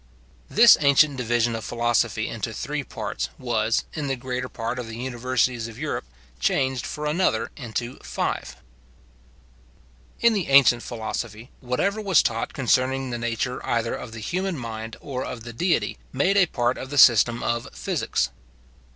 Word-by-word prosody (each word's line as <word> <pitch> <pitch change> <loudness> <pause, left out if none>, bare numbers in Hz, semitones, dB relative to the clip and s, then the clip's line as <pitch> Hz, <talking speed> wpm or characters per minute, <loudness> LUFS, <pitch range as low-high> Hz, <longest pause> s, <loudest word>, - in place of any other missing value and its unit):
This - - +7
ancient 140 0 +5
division 120 -1 +1
of 110 - -5
philosophy 115 -2 0
into 115 0 -4
three 145 +4 -3
parts - - -4
was, 115 -2 0
in 150 -2 -3
the 135 - 0
greater 125 0 -4
part 115 +2 -4
of 120 - -5
the 115 0 -7
universities 125 -1 -1
of 115 -1 -11
Europe, 145 - -3 0.3
changed 130 - 0
for 150 0 -5
another 150 -7 +1
into 120 -1 -5
five. - - -3 1.6
In 235 -1 +4
the 200 -6 -1
ancient 135 -3 +6
philosophy, 115 0 -5
whatever 195 - -1
was 195 -6 +4
taught 115 0 -1
concerning 130 0 +1
the 120 - -3
nature 120 +2 -2
either 115 -1 0
of 115 - -6
the 115 -1 -8
human 185 - -2
mind 115 -2 -6
or 130 -3 -4
of 115 - -6
the 120 0 -8
Deity, 175 +8 0
made 180 +9 +2
a 195 -3 +5
part 120 -4 0
of 130 - -7
the 145 - -4
system 120 -2 +6
of 120 0 -1
physics. - - -1
125 Hz, 160 wpm, -24 LUFS, 115-140 Hz, 1.6 s, This